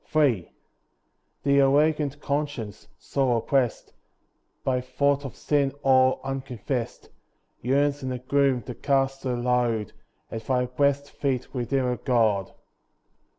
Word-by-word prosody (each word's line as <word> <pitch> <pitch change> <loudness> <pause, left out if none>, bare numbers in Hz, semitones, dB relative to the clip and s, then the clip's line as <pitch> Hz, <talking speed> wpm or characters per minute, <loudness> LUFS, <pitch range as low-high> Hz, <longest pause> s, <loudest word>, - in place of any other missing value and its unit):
III 130 - +2 0.9
The 140 0 +4
awakened 145 +1 +3
conscience, 140 -8 -3
sore 130 -4 0
oppressed 125 +1 0 0.7
By 125 -1 +1
thought 140 +2 +1
of 135 - -7
sin 140 -2 +1
all 130 -1 +4
unconfessed, 130 -2 -4 0.5
Yearns 140 +3 +1
in 130 - -3
the 125 - -2
gloom, 130 -1 +1
to 125 - -6
cast 135 +1 0
her 125 -2 0
load 120 -3 0 0.4
At 110 -1 -6
Thy 125 -1 +2
blest 140 +3 0
feet, 130 -3 -2
Redeemer, 125 0 0
God. 110 -7 +1
130 Hz, 115 wpm, -26 LUFS, 125-140 Hz, 0.9 s, The